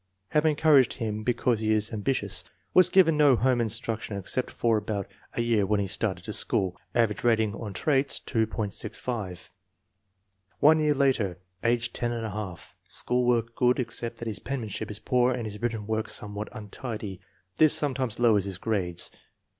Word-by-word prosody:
" - - -50
Have 150 +1 +2
encouraged 150 -4 +4
him 110 -3 -3
because 120 0 +1
he 110 0 0
is 110 0 +1
not 110 - -4
am - - -8
bitious/' 100 -7 +1 0.3
Was 185 -1 +7
given 175 -5 +5
no 145 -3 +6
home 125 0 +2
instruction 110 -2 -2
except 100 +6 -1
for 115 -1 +1
about 105 -2 -3 0.3
a - - -1
year 115 -3 +2
when 105 +1 +1
he 100 - 0
started 95 - -2
to - - -4
school. 95 -2 +1 0.2
Average 115 -3 +1
rat 115 -2 +4
ing 110 -2 0
on 105 -1 -6
traits, 140 +6 +1
2.65. 110 -3 -3 1.1
One 155 +2 +6
year 150 -1 +2
later, 125 -10 +1 0.3
age 120 0 +1
10J. 110 -6 -4
School 125 0 0
work 115 -1 +1
good, 125 0 +3
except 120 -1 -3
that 115 - -6
his 105 -3 -3
penmanship 110 -5 -4
is 105 - -3
poor 125 +3 +2
and 120 -2 -4
his 105 0 -7
written 115 -3 -2
work 110 +1 -2
somewhat 105 0 -3
untidy. 105 -3 -7 0.4
This 155 -2 +7
sometimes 130 -6 0
lowers 110 -5 +4
his 95 -2 -5
grades. 95 -5 -1
115 Hz, 170 wpm, -27 LUFS, 105-125 Hz, 1.1 s, Was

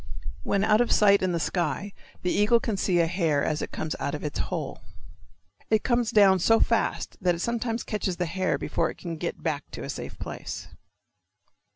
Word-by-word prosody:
When 200 0 0
out 215 +1 +4
of 240 - +1
sight 200 -1 +5
in 185 -1 +1
the 170 - 0
sky 175 +4 -2 0.3
the 180 - +1
eagle 210 +3 +4
can 225 -2 -2
see 185 -2 +1
a 170 - +4
hare 165 -4 +1
as 155 -1 -1
it - - -3
comes 155 - -3
out 140 - -2
of 150 - -7
its 150 - -3
hole. - - -3 0.9
It 220 -1 +3
comes 240 -2 +1
down 200 -5 +5
so 225 +6 +4
fast 230 -1 0
that 180 -2 +2
it - - -7
sometimes 235 0 -1
catches 195 -4 -2
the 180 - 0
hare 185 +2 0
before - - -1
it - - -8
can 170 -2 -5
get 170 +2 -4
back 150 -4 -2
to - - -7
a - - -6
safe - - -7
place. - - -6
190 Hz, 205 wpm, -26 LUFS, 170-215 Hz, 0.9 s, sight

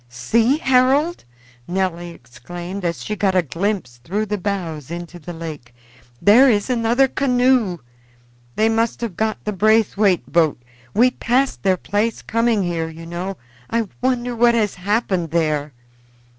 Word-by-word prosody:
"See, 225 - +1
Harold!" 270 - +2 0.4
Nelly 175 -2 -2
exclaimed 175 +8 -8
as 170 -8 -2
she 210 - -3
got 195 -2 +1
a 180 - +4
glimpse 165 - -3
through 190 - -3
the 210 0 -2
boughs 170 -8 -4
into 175 +1 -7
the 170 +2 -8
lake, 155 -8 -8 0.4
"there 245 +7 +6
is 210 +2 +1
another 240 +2 +3
canoe. 250 -7 +2 0.8
They 220 - +3
must 225 +1 0
have 225 -7 -4
got 220 +2 -2
the 210 - -2
Braithwaite 205 - +2
boat. 160 -6 +3 0.4
We 250 +3 +5
passed 255 +3 0
their 190 -2 +2
place 210 +5 -1
coming 230 -2 +1
here, 165 -2 -2
you 165 +1 -10
know. 175 +3 -5 0.3
I 230 -3 -1
wonder 245 -1 0
what 235 0 +4
has 215 -3 +1
happened 190 -3 -1
there." 155 -2 0
200 Hz, 145 wpm, -20 LUFS, 170-230 Hz, 0.8 s, there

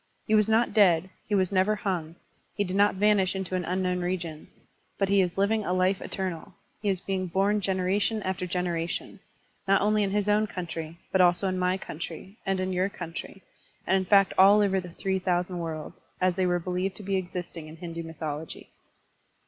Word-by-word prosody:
He 215 - 0
was 215 0 +4
not 225 +2 +3
dead, 185 -4 +4 0.2
he 210 - +2
was 185 -1 +2
never 195 +2 +3
hung, 175 -6 -3 0.4
he 205 - +1
did 185 -1 -3
not 205 0 +4
vanish 200 -1 +3
into 190 -1 -4
an 185 - +1
tuiknown 180 +1 -1
region; 170 -3 -3 0.5
but 195 -1 +1
he 200 0 +5
is 180 -1 -1
living 210 +2 +2
a 180 - -1
life 185 +1 +2
eternal, 185 -1 -4 0.3
he 210 - 0
is 190 -2 0
being 190 -1 -2
bom 195 +4 +1
generation 195 +3 0
after 185 -1 -2
generation, 175 -1 -3 0.5
not 195 0 +5
only 210 +1 +2
in 200 - +1
his 205 +1 0
own 210 +1 +3
country, 165 -3 -6
but 190 - +4
also 180 +2 +4
in 185 -1 -1
my 180 +1 +1
country, 170 +3 -7
and 195 -1 +1
in 185 0 -1
your 185 +2 +1
country, 180 +1 -8 0.4
and 190 - +3
in 190 -1 +1
fact 195 0 +5
all 200 +2 +7
over 195 -2 +2
the 180 - -9
three 190 +2 -2
thousand 180 -1 -1
worlds 160 -2 -5 0.2
(as 185 -1 +2
they 185 0 +1
were 175 0 +2
believed 180 +2 -2
to 210 - -9
be 195 0 -1
existing 175 -3 -4
in 155 - -10
Hindu 170 -1 -6
m)rthology). 155 -1 -6
185 Hz, 195 wpm, -27 LUFS, 175-195 Hz, 0.5 s, all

